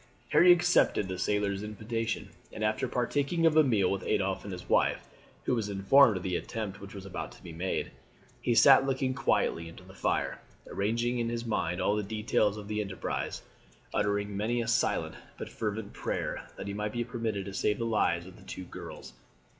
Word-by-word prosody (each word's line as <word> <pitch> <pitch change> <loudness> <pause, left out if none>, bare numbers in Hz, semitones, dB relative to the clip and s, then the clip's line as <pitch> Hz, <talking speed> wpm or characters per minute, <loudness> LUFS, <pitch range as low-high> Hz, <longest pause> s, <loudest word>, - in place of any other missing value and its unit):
Harry 180 +1 +7
accepted 175 - +4
the 95 -1 -4
sailor's 100 0 0
invitation; 110 +2 -3 0.2
and 110 - -5
after 110 +4 +1
partaking 140 +7 0
of 160 -1 +5
a 155 - +7
meal 110 -9 +2
with 100 - -1
Adolphe 95 -1 0
and 100 - -5
his 90 -1 -7
wife, - - +2 0.4
who - - 0
was 110 -4 -1
informed 100 +3 +5
of 90 - -6
the 90 -2 -1
attempt 100 0 -4
which 100 +1 -10
was 95 -1 -8
about 95 - -5
to - - -16
be 85 - -8
made, 90 +3 -2 0.5
he 120 - +1
sat 135 +3 +8
looking 130 -1 0
quietly 85 -10 0
into 85 - -13
the 95 +1 -14
fire, 95 - -1 0.3
arranging 115 +4 0
in 115 -1 0
his 120 0 -3
mind 90 -5 -1
all 100 +3 +2
the 105 - 0
details 105 0 0
of 105 -1 -8
the 105 0 -1
enterprise, 95 -3 -4 0.5
uttering 100 0 0
many 110 +4 0
a 115 - -2
silent 120 0 +1 0.2
but - - -6
fervent 105 -1 -4
prayer - - -3
that - - -6
he 100 - -4
might 105 +1 -3
be 120 - -1
permitted 115 -5 -3
to 100 - -7
save 105 +1 +1
the 115 - -2
lives 105 -6 +1
of 95 0 -12
the - - -16
two 95 - -7
girls. 90 - -9
105 Hz, 200 wpm, -30 LUFS, 100-120 Hz, 0.5 s, sat